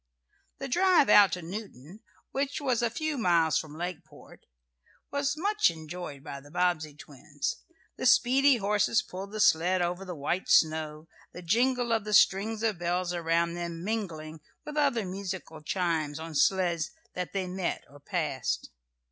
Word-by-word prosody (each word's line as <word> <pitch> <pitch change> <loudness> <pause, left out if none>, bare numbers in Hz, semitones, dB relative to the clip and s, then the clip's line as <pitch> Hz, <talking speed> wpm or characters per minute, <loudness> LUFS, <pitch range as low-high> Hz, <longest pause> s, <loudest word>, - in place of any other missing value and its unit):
The 275 - -5
drive 355 +2 +4
out 205 -2 +7
to 180 - -4
Newton, 180 - -8 0.3
which 275 +1 -2
was 255 -5 0
a 235 - +1
few 310 +4 -3
miles 170 -6 +3
from 155 -1 -8
Lakeport, 175 -1 -8 0.6
was 285 +1 -1
much 420 +5 +2
enjoyed 160 -3 -8
by 140 - -7
the 145 - -16
Bobbsey 170 -3 0
twins. 145 0 -5 0.4
The - - 0
speedy 265 +3 +5
horses 210 +1 +1
pulled 195 +2 -8
the 215 - -5
sled 180 -1 +4
over 175 +2 -1
the 180 -2 -6
white 160 +6 -2
snow, 155 0 +2 0.3
the 180 - -9
jingle 240 +6 +1
of 225 -2 +1
the 210 0 0
strings 215 +4 +3
of 215 -6 0
bells 175 +1 -1
around 170 0 0
them 170 -1 -5
mingling 165 -8 -4 0.2
with 300 - -7
other 275 -8 +1
musical 185 -4 -6
chimes 160 -3 -1
on 160 0 -7
sleds 175 0 +2 0.2
that 180 -3 -4
they 195 -2 -1
met, 185 0 -3
or 145 - -16
passed. 150 - -2
180 Hz, 155 wpm, -28 LUFS, 160-225 Hz, 0.6 s, out